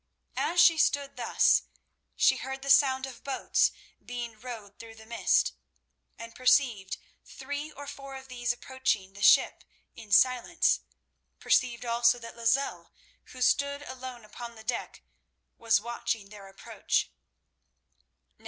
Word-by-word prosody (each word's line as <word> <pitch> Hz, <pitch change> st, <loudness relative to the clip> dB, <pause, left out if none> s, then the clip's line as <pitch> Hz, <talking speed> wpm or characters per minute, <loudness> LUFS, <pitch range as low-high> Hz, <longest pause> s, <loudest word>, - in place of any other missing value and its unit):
As 350 Hz, -, 0 dB
she 335 Hz, -2 st, +6 dB
stood 280 Hz, -2 st, +1 dB
thus, 240 Hz, -2 st, +3 dB, 0.5 s
she -, -, +4 dB
heard 265 Hz, 0 st, -6 dB
the 275 Hz, -, +1 dB
sound 265 Hz, -2 st, +4 dB
of 265 Hz, -2 st, -11 dB
boats 275 Hz, -, +1 dB, 0.3 s
being 240 Hz, -3 st, -6 dB
rowed 220 Hz, -4 st, -9 dB
through 225 Hz, -1 st, -11 dB
the 220 Hz, 0 st, -14 dB
mist, 230 Hz, 0 st, +1 dB, 0.6 s
and 230 Hz, 0 st, -9 dB
perceived 255 Hz, -6 st, +2 dB, 0.3 s
three 290 Hz, +2 st, -6 dB
or 285 Hz, -1 st, -10 dB
four 275 Hz, -1 st, -9 dB
of 265 Hz, 0 st, -10 dB
these 245 Hz, -2 st, -2 dB
approaching 240 Hz, -6 st, -2 dB
the 200 Hz, -, -12 dB
ship -, -, +5 dB, 0.3 s
in 220 Hz, -3 st, -13 dB
silence, 255 Hz, +9 st, +3 dB, 0.6 s
perceived 245 Hz, -1 st, +1 dB
also 235 Hz, +1 st, +3 dB
that 230 Hz, -1 st, -10 dB
Lozelle, 235 Hz, +4 st, 0 dB, 0.3 s
who 255 Hz, 0 st, -5 dB
stood 280 Hz, +2 st, +1 dB
alone 255 Hz, -3 st, -9 dB
upon 235 Hz, +2 st, -9 dB
the 220 Hz, -, -13 dB
deck, 235 Hz, +2 st, -4 dB, 0.6 s
was 230 Hz, -2 st, +3 dB
watching 225 Hz, -2 st, -4 dB
their 200 Hz, -1 st, -12 dB
approach. 195 Hz, 0 st, -2 dB
245 Hz, 135 wpm, -28 LUFS, 230-270 Hz, 0.6 s, she